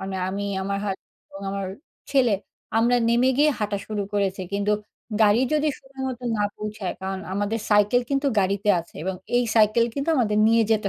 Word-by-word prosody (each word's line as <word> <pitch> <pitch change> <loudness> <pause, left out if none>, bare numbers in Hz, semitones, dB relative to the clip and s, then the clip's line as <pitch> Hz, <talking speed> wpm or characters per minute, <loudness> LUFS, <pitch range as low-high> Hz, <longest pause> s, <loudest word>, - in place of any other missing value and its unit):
মানে 190 0 -4
আমি, 200 +1 -3 0.2
আমার 200 +1 -2
হাজ 195 -2 -1 0.3
এবং 195 - -10
আমার 195 -1 -3 0.4
ছেলে, 260 -5 +3 0.5
আমরা 240 +2 +4
নেমে 240 +2 +3
গিয়ে 300 +1 +5
হাঁটা 205 -1 -1
শুরু 210 -2 -2
করেছি। 195 -1 0
কিন্তু 205 +1 +1 0.5
গাড়ি 210 +3 +5
যদি 305 0 +2
সময়মতো 265 -2 -6
না 205 - 0
পৌঁছায়, 210 -3 -4
কারণ 190 0 -3
আমাদের 205 +2 -1
সাইকেল 210 +4 +4
কিন্তু 275 +1 +1
গাড়িতে 200 +2 0
আছে 170 - -17
এবং 190 0 -1 0.2
এই 245 - +3
সাইকেল 220 +2 +5
কিন্তু 280 +3 -3
আমাদের 210 -4 +2
নিয়ে 230 0 +5
যেতে 210 -2 +1
210 Hz, 175 wpm, -24 LUFS, 200-245 Hz, 0.5 s, গিয়ে